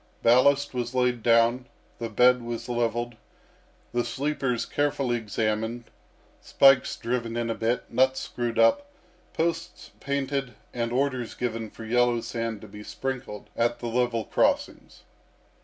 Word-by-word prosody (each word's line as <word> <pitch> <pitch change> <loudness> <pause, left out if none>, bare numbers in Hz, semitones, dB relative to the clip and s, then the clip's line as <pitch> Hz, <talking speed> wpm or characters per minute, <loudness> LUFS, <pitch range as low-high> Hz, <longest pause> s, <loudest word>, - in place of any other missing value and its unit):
Ballast 140 +4 +4
was 125 0 -3
laid 125 -2 +1
down, 115 +2 +3 0.3
the 115 -1 -3
bed 125 +3 +4
was 120 -1 -5
levelled, 120 0 -1 0.8
the 120 0 +1
sleepers 130 0 -1
carefully 140 -4 0
examined, 110 +1 -2 0.5
spikes 135 -1 +4
driven 115 -1 -3
in 115 -1 -1
a - - 0
bit, 115 +2 -1
nuts 130 +1 +3
screwed 120 -1 -3
up, 285 0 +4 0.4
posts 165 +1 -3
painted, 140 -3 -2 0.2
and 115 -1 -2
orders 130 -2 -1
given 115 -2 -3
for 110 - -10
yellow 120 +1 +2
sand 115 -2 -4
to 110 - -10
be 105 +1 -11
sprinkled 125 -2 -6
at 120 0 +1
the - - -8
level 115 -1 0
crossings. - - -1
120 Hz, 135 wpm, -26 LUFS, 115-130 Hz, 0.8 s, Ballast